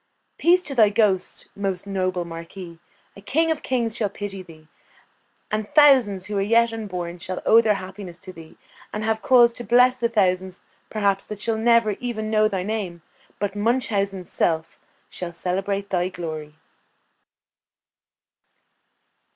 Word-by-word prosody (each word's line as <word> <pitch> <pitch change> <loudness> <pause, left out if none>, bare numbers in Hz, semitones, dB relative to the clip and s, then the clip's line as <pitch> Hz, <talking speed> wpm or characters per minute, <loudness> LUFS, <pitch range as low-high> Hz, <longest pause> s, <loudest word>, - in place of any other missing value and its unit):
Peace 360 +2 +4
to 285 - -4
thy 220 -5 +5
ghost, 205 -3 0
most 195 -2 -3
noble 185 -2 -2
marquis! 170 +1 -9 0.4
a 200 - -12
King 320 +10 +1
of 315 - -2
kings 235 -4 -1
shall 210 -3 0
pity 200 -1 -6
thee; 160 -3 -15 0.8
and 215 0 -2
thousands 255 -11 +5
who 210 - -4
are - - +1
yet 230 +3 +3
unborn 180 -6 -5
shall 185 +2 -5
owe 225 +1 +7
their 215 -2 +2
happiness 190 -2 -8
to 185 +1 -11
thee, 165 -2 -14 0.3
and 210 - -4
have 220 0 0
cause 240 -2 +5
to 240 - -8
bless 250 +3 +4
the 235 - +1
thousands, 185 -4 0 0.3
perhaps, 200 -2 0
that 210 -1 -7
shall 225 +1 -1
never 230 -1 +3
even 220 -3 -4
know 215 0 +4
thy 190 -3 -2
name; 190 -5 -4 0.3
but 205 0 -3
Munchausen's 205 -4 -1
self 160 -1 -1 0.3
shall 180 -1 -6
celebrate 195 +3 -3
thy 180 -1 +1
glory! 155 -4 -7
200 Hz, 150 wpm, -23 LUFS, 185-225 Hz, 0.8 s, owe